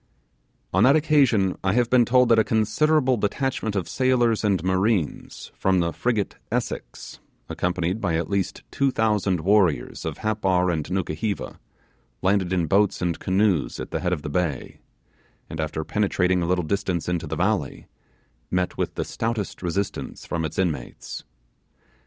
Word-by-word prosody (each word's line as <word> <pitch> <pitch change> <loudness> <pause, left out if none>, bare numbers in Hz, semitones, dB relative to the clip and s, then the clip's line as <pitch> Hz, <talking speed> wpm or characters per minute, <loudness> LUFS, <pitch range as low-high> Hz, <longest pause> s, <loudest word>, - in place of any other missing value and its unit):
On 95 +3 +4
that 135 +4 +6
occasion 140 -11 +3
I 95 -1 +2
have 120 0 +1
been 125 -2 +5
told 125 +1 +4
that 115 -1 +6
a - - +5
considerable 130 +5 +2
detachment 110 +1 -1
of 95 - -1
sailors 120 -4 +2
and 100 -5 +1
marines 95 -1 -1
from 95 -1 +1
the 85 -1 0
frigate 115 -5 -1
Essex, - - -4 0.3
accompanied 90 +3 -1
by 85 - 0
at 85 - -1
least 100 -2 -2
two 140 0 +1
thousand 105 -7 +1
warriors 90 - +2
of - - -4
Happar 95 -4 +1
and 80 -3 -3
Nukuheva, 95 +2 -3 0.6
landed 95 -1 +2
in 90 -3 +1
boats 100 +4 +2
and 85 -2 -1
canoes 95 -4 +1
at - - -6
the - - -1
head 90 - -1
of 80 -5 -2
the 75 - -4
bay, 80 -2 -2 0.7
and 80 - -6
after 80 0 -2
penetrating 95 -2 +1
a 85 - -1
little 90 -1 +1
distance 90 -2 -1
into 85 -2 -2
the 80 - -3
valley, - - -1 0.6
met 90 0 -1
with - - -2
the - - -2
stoutest 115 -3 -3
resistance 95 +3 -3
from 85 -2 -2
its 80 - -6
inmates. 80 -10 -3
95 Hz, 160 wpm, -24 LUFS, 90-110 Hz, 0.7 s, that